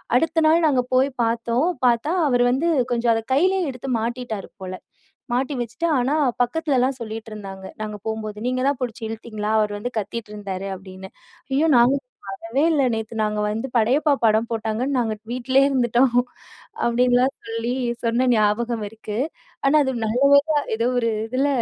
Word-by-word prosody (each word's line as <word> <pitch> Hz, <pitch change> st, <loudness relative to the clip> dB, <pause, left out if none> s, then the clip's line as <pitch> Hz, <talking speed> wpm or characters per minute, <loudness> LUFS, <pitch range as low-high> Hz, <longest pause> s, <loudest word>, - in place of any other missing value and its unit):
அடுத்த 325 Hz, +5 st, +2 dB
நாள் 330 Hz, +1 st, +4 dB
நாங்க 265 Hz, -4 st, +3 dB
போய் 260 Hz, +2 st, +4 dB
பாத்தோம். 235 Hz, +5 st, 0 dB, 0.2 s
பாத்தா, 240 Hz, +5 st, +2 dB, 0.2 s
அவர் 245 Hz, -3 st, +3 dB
வந்து, 290 Hz, +7 st, +1 dB, 0.2 s
கொஞ்சம் 235 Hz, -1 st, +2 dB
அத 225 Hz, -, -1 dB
கைலயே 370 Hz, +6 st, +3 dB
எடுத்து 255 Hz, +1 st, -7 dB
மாட்டிட்டாரு 230 Hz, -3 st, -4 dB
போல. 185 Hz, 0 st, -5 dB, 0.6 s
மாட்டி 260 Hz, +4 st, 0 dB
வச்சிட்டு, 250 Hz, +9 st, -3 dB
ஆனா, 255 Hz, +4 st, +1 dB, 0.3 s
பக்கத்துலலாம் 270 Hz, -2 st, 0 dB
சொல்லிட்டு 225 Hz, 0 st, -6 dB
இருந்தாங்க, 195 Hz, -2 st, -8 dB, 0.2 s
நாங்க 210 Hz, -1 st, -4 dB
போம்போது. 215 Hz, -1 st, -4 dB
"நீங்க 255 Hz, 0 st, -1 dB
தான் 280 Hz, -2 st, 0 dB
புடிச்சு 235 Hz, -2 st, -4 dB
இழுத்தீங்களா? 220 Hz, -1 st, -5 dB
அவர் 210 Hz, -1 st, 0 dB
வந்து 245 Hz, +4 st, -4 dB
கத்திட்ருந்தாரு" 205 Hz, -3 st, -5 dB
அப்டின்னு. 190 Hz, 0 st, -10 dB, 0.4 s
"ஐயோ! 290 Hz, +4 st, +3 dB
நாங்க 245 Hz, +4 st, +5 dB, 0.3 s
பாக்கவே 225 Hz, +7 st, -2 dB
இல்ல. 295 Hz, -3 st, +2 dB
நேத்து 220 Hz, +1 st, -5 dB
நாங்க 210 Hz, 0 st, -1 dB
வந்து, 225 Hz, +4 st, -3 dB
படையப்பா 270 Hz, +7 st, +3 dB
படம் 220 Hz, +2 st, +2 dB
போட்டாங்கன்னு, 225 Hz, +5 st, -1 dB
நாங்க 220 Hz, -2 st, -1 dB, 0.2 s
வீட்லேயே 260 Hz, +2 st, +3 dB
இருந்துட்டோம்" 245 Hz, -1 st, +2 dB, 0.7 s
அப்டின்னுலாம் 250 Hz, +3 st, +3 dB
சொல்லி, 230 Hz, +2 st, -2 dB, 0.3 s
சொன்ன 235 Hz, +2 st, +2 dB
ஞாபகம் 220 Hz, +1 st, +1 dB
இருக்கு. 215 Hz, -1 st, -6 dB, 0.5 s
ஆனா, 280 Hz, +3 st, +4 dB
அது 265 Hz, -, -1 dB
நல்ல 235 Hz, +4 st, 0 dB, 0.3 s
வேளையா 310 Hz, -2 st, +2 dB, 0.2 s
ஏதோ 230 Hz, +2 st, +1 dB
ஒரு 230 Hz, -1 st, +1 dB, 0.2 s
இதுல, 260 Hz, +4 st, +1 dB
235 Hz, 155 wpm, -22 LUFS, 220-260 Hz, 0.7 s, நாங்க